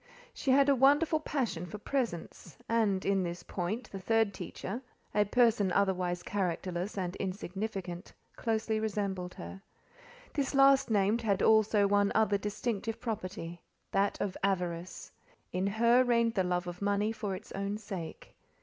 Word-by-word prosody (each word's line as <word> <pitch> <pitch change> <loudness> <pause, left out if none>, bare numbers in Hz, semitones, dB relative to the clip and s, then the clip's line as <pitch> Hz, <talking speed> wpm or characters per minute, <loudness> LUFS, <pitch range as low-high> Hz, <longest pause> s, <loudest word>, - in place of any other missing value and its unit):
She 275 - -3
had 275 +1 +6
a 280 - +6
wonderful 290 +5 +4
passion 235 - -2
for 210 - -7
presents; 210 - -3
and, 215 -5 +1
in 195 -1 +2
this 175 -1 -4
point, 200 +7 -4
the 195 - -5
third 220 +1 +2
teacher—a 210 +1 -4
person 225 -3 +3
otherwise 180 -2 +1
characterless 185 0 -2
and 180 -1 -2
insignificant—closely 200 +3 -3
resembled 200 -4 -2
her. 195 - -8 0.7
This 280 -1 -1
last 275 -1 +6
named 210 +2 +2
had 205 -4 +1
also 220 -1 +5
one 205 0 +3
other 215 -2 +3
distinctive 210 +1 -3
property—that 195 -2 -3
of 195 -3 -2
avarice. 180 -2 -2 0.4
In 185 +2 0
her 235 +4 +4
reigned 235 -2 +2
the 190 -4 +1
love 180 0 0
of 175 +1 -7
money 205 +1 +1
for 205 -3 -3
its - - -11
own 200 +1 -2
sake. 190 -7 -7
200 Hz, 140 wpm, -31 LUFS, 185-225 Hz, 0.7 s, had